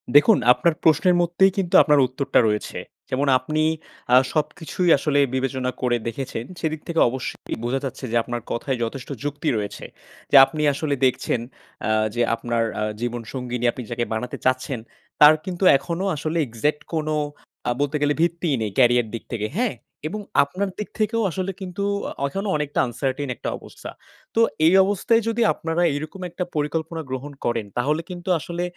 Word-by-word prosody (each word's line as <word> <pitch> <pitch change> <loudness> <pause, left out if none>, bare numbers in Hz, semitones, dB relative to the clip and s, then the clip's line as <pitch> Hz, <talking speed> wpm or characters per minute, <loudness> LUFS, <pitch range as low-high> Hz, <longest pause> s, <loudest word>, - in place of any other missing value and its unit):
দেখুন, 195 +9 +7 0.2
আপনার 170 +5 +1
প্রশ্নের 165 +3 +4
মধ্যেই 175 +3 +3
কিন্তু 180 -3 0
আপনার 150 -2 +4
উত্তরটা 135 +2 +1
রয়েছে। 105 -1 -2 0.3
যেমন 140 +3 0
আপনি, 155 +4 -1 0.5
আ - - +9 0.2
সবকিছুই 160 +3 -1
আসলে 145 0 +1 0.2
বিবেচনা 130 -1 -1
করে 120 -1 +2
দেখেছেন, 115 -1 -4
সেদিক 155 -1 -2
থেকে 165 -1 0
অবশ্যই 130 +1 -5
বোঝা 125 +3 0
যাচ্ছে 130 0 -5
যে - - -1
আপনার 120 0 -4
কথায় 130 +2 -2
যথেষ্ট 130 +3 -5
যুক্তি 145 +1 -2
রয়েছে। 105 -1 -5 0.5
যে - - +4
আপনি 155 +2 -5
আসলে 145 0 -1
দেখছেন, 125 -1 +1 0.5
আ - - +1 0.2
যে 120 - +1
আপনার 115 0 -1 0.2
আ - - +1 0.2
জীবন 120 0 -2
সঙ্গীনি 125 -2 -3
আপনি 125 - -7
যাকে 120 0 -1
বানাতে 120 +3 -3
চাচ্ছেন, 130 0 0 0.4
তার 150 +1 +10
কিন্তু 185 0 -4
এখনো 170 +7 -3
আসলে 155 +3 -2
exact 145 +6 -1
কোনো 155 -1 -1 0.6
আ - - +2
বলতে 145 +1 0
গেলে 145 0 +3
ভিত্তিই 170 -3 +1
নেই 105 - -2
career 120 -2 +5
দিক 115 - -5
থেকে, 105 -2 -1
হ্যাঁ? 240 -2 0 0.3
এবং 210 +4 -5 0.2
আপনার 185 +8 -3
দিক 210 - -4
থেকেও 225 +2 +1
আসলে 185 +3 -2
কিন্তু 185 +1 -4 0.3
আ - - -7
এখনও 195 +8 -3
অনেকটা 150 -1 -2
uncertain 135 +3 -3
একটা - - -4
অবস্থা। - - -11 0.5
তো 225 - +4 0.2
এই 165 - +6
অবস্থায় 215 +4 +2
যদি 230 +1 0
আপনারা 165 +1 -2
এইরকম 155 +6 -6
একটা 175 +2 -3
পরিকল্পনা 160 +2 -2
গ্রহণ 130 +3 -5
করেন 120 -2 0
তাহলে 150 +6 +1
কিন্তু 180 +1 -6
আসলে, 170 +3 -4
145 Hz, 170 wpm, -23 LUFS, 125-170 Hz, 0.6 s, তার